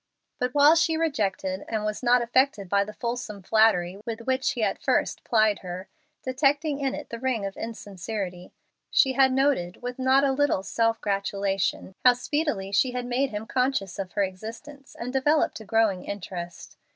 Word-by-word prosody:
But 250 +1 -2
while 290 +2 +7
she 330 -1 +2
rejected 200 - -1
and 215 -2 -2
was 210 0 -3
not 245 0 +4
affected 240 -4 +1
by 200 +2 +2
the 215 +1 -9
fulsome 235 -5 -4
flattery 195 -3 +3
with 230 -1 -5
which 260 +2 0
he 235 - -2
at - - -1
first - - 0
plied 215 -3 +2
her, 185 +1 -7 0.3
detecting 285 +3 +1
in 270 -2 -1
it - - -9
the 235 - -5
ring 245 -5 -1
of 195 - -5
insincerity, 195 -4 -6 0.4
she 265 -2 +3
had 265 0 +4
noted, 260 -9 0
with 245 +1 -5
not 260 +1 +4
a 275 - +3
little 270 -8 +1
self 225 +3 0
gratulation, 195 -1 -1
how 250 - +8
speedily 245 -6 -2
she 245 +6 +2
had 250 -1 -3
made 255 +3 0
him 210 -1 -5
conscious 250 -7 -1
of 185 -2 -5
her 205 - +2
existence 230 +9 -8
and 250 +2 -5
developed 290 +2 +2
a 220 - -11
growing 215 -4 +2
interest. 175 -3 -7
230 Hz, 175 wpm, -26 LUFS, 195-265 Hz, 0.4 s, how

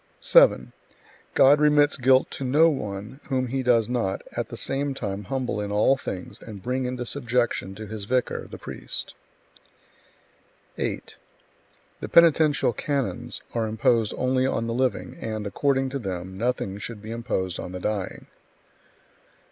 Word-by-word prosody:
7. - - +5 0.6
God 145 +2 +6
remits 150 0 +4
guilt 130 -1 +3
to - - -4
no 150 +6 +5
one 105 -1 -5
whom 130 -2 -1
He 135 +2 -1
does 120 -3 +3
not, 115 -6 -1
at - - -2
the - - -7
same 140 0 -1
time, 100 -4 -4
humble 125 -2 -2
in 100 0 -4
all 105 +6 +4
things 95 -8 -7
and 105 -3 -9
bring 130 +2 -1
into 125 0 -3
subjection 120 -6 -1
to 110 +2 -7
His 105 -1 -6
vicar, 125 +3 -1
the - - -9
priest. - - -6 1.7
8. - - -4 0.8
The - - -6
penitential 160 -6 +5
canons 130 -1 -3
are 115 -2 0
imposed 110 0 +1
only 130 0 +1
on 115 -3 -1
the 115 - -2
living, 130 +1 -1
and, 110 -1 -4
according 135 +5 +1
to 140 +1 -3
them, 95 -3 -5
nothing 105 -3 -2
should 105 0 -7
be 110 - -7
imposed 95 -6 -2
on - - -6
the 90 - -5
dying. 100 0 -3
120 Hz, 150 wpm, -25 LUFS, 105-135 Hz, 1.7 s, God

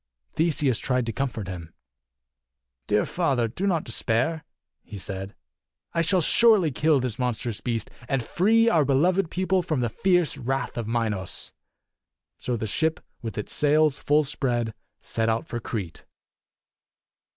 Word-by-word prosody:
Theseus 150 -7 +1
tried 125 -2 0
to 115 - -3
comfort 120 -7 -3
him. 85 -3 -8 1.1
"Dear 105 0 +2
father, 135 -9 0
do 180 - -3
not 170 -5 +1
despair," 125 +8 0 0.4
he 105 - -10
said. 95 +1 -5 0.3
" - - -52
I 165 - +2
shall 180 +2 +2
surely 205 -2 +5
kill 150 +2 +3
this 125 -2 -3
monstrous 120 -3 -2
beast 115 -3 -2 0.2
and 135 -3 0
free 225 - +3
our 165 -9 +4
beloved 165 +7 +2
people 185 +1 +1
from 155 -6 -1
the 120 - 0
fierce 175 - +1
wrath 130 0 -2
of 115 -2 -3
Minos." 110 -5 -2 0.9
So 125 -1 -2
the 110 - -3
ship, 160 +9 0 0.2
with 115 -3 -6
its 105 - -3
sails 150 0 +3
full 150 +1 +3
spread, 120 -5 -1 0.3
set 115 0 -1
out 115 +6 0
for 120 - -4
Crete. 95 -8 -5
130 Hz, 150 wpm, -25 LUFS, 115-160 Hz, 1.1 s, surely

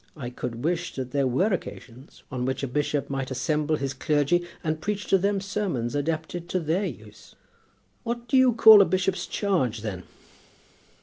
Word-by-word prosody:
I 125 -4 -6
could 120 -1 -6
wish 175 +1 -1
that 130 -2 -5
there 140 -1 +1
were 185 - +1
occasions 130 -6 -8
on 125 -2 -3
which 130 +1 -2
a - - 0
bishop 145 +2 -1
might 135 -2 -3
assemble 150 +3 0
his 135 -2 -3
clergy, 150 +6 +1 0.2
and 155 0 -2
preach 205 0 -3
to 195 - +5
them 200 +1 +1
sermons 190 - -2
adapted 160 +4 -3
to 185 - 0
their 170 +5 0
use." 105 - -12 0.7
"What 235 +1 -4
do 250 - 0
you 260 -2 +5
call 220 -2 +9
a - - +5
bishop's 185 -1 -1
charge, 135 - -1
then?" 100 -5 -5
155 Hz, 175 wpm, -26 LUFS, 130-190 Hz, 0.7 s, call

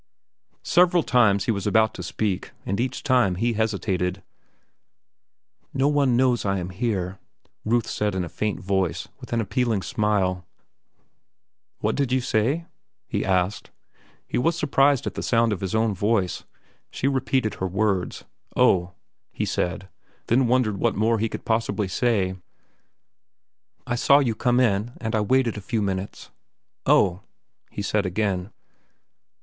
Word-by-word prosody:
Several 175 -1 +4
times 105 -6 +3
he - - +2
was 100 -2 -2
about 110 +1 +3
to - - -7
speak, 95 +2 -3
and 100 - -2
each 125 0 -2
time 125 -9 +3
he 115 +6 0
hesitated. 100 -4 -1 1.5
"No 135 +1 +2
one 140 -4 +2
knows 125 -2 +2
I 100 -1 0
am 90 0 -4
here," 95 -3 -2 0.5
Ruth 115 +1 +2
said 105 -2 -2
in 95 - -1
a - - -7
faint 105 +4 -3
voice, 95 -3 -1
with - - -11
an 115 - +1
appealing 110 -1 0
smile. 95 -4 0 1.4
"What - - +1
did 140 -3 0
you 130 - +3
say?" 125 +7 0 0.4
He - - -2
was 100 - -2
surprised 140 -3 +3
at - - -3
the - - -5
sound 115 -2 +2
of 100 - -5
his 95 +1 -2
own 110 -1 +2
voice. 100 -1 0 0.4
She 135 - -2
repeated 130 -4 0
her 95 - +1
words. 95 -1 -1 0.3
"Oh," 90 -1 +3 0.4
he - - -2
said, 90 +2 -2 0.4
then 125 +2 +3
wondered 120 -4 +2
what 115 +1 +1
more 110 +1 +2
he 115 +1 0
could - - -7
possibly 110 -2 0
say. 95 -2 +1 1.5
"I - - -2
saw 140 +3 +5
you 130 -6 +2
come 125 +3 +1
in, 115 -1 +1
and 110 -1 -3
I 110 - +2
waited 120 +1 +1
a - - -5
few 110 +1 -1
minutes." 95 0 -4 0.6
"Oh," 95 -1 +4 0.5
he 100 - -5
said 100 0 0
again. 95 0 -1
110 Hz, 145 wpm, -24 LUFS, 95-120 Hz, 1.5 s, saw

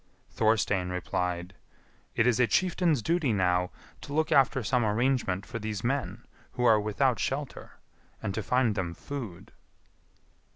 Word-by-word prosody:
Thorstein 105 -4 +1
replied, 90 0 -3 0.6
"It 110 - +3
is 125 -1 +3
a 125 - +4
chieftain's 170 - +1
duty 165 -6 +1
now 90 -2 +1 0.3
to 145 - -8
look 155 +1 +1
after 135 -1 +4
some 125 +3 +1
arrangement 110 -3 0
for 115 - -6
these 105 -2 -4
men 120 -4 -2 0.3
who 125 -1 -1
are 110 -3 +6
without 115 +5 +1
shelter, 140 +1 -4 0.5
and 95 - -3
to 110 - -2
find 125 0 +2
them 90 -4 -3
food." 115 -10 -7
115 Hz, 140 wpm, -28 LUFS, 95-130 Hz, 0.6 s, are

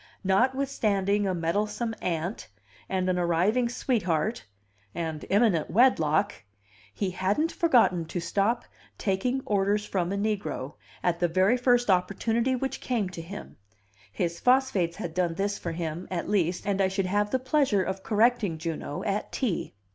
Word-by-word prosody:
Notwithstanding 205 -2 +1
a 185 - 0
meddlesome 210 +7 -1
aunt, 170 - -3 0.4
and 185 -1 0
an 180 -1 +1
arriving 185 +8 +2
sweetheart, 215 - -1 0.5
and 160 -3 -3
imminent 200 -6 +3
wedlock, 200 - +3 0.6
he 185 - -2
hadn't 200 - 0
forgotten 240 - +3
to 175 - -4
stop 200 +7 0 0.3
"taking 245 +7 -1
orders 205 +1 +1
from 180 -3 -1
a 200 - -1
negro" 200 -9 -2 0.3
at 170 -1 +1
the 175 - +3
very 185 +7 +3
first 245 -3 +3
opportunity 225 +7 +1
which 265 +1 -3
came 225 -7 -1
to 180 -2 -7
him; 195 +5 -9 0.5
his 170 - -2
phosphates 250 -10 +2
had 165 - -5
done 175 -1 0
this 200 +2 -1
for 170 - -4
him, 165 +1 -4
at 180 -2 -3
least, 180 -3 0
and 200 -1 +1
I 190 - +4
should 190 0 -1
have 205 +3 +1
the 260 - +1
pleasure 260 -6 +2
of 190 +1 -4
correcting 215 -4 +2
Juno 160 -2 -4
at 205 0 -2
tea. 215 - -2
195 Hz, 150 wpm, -27 LUFS, 175-230 Hz, 0.6 s, I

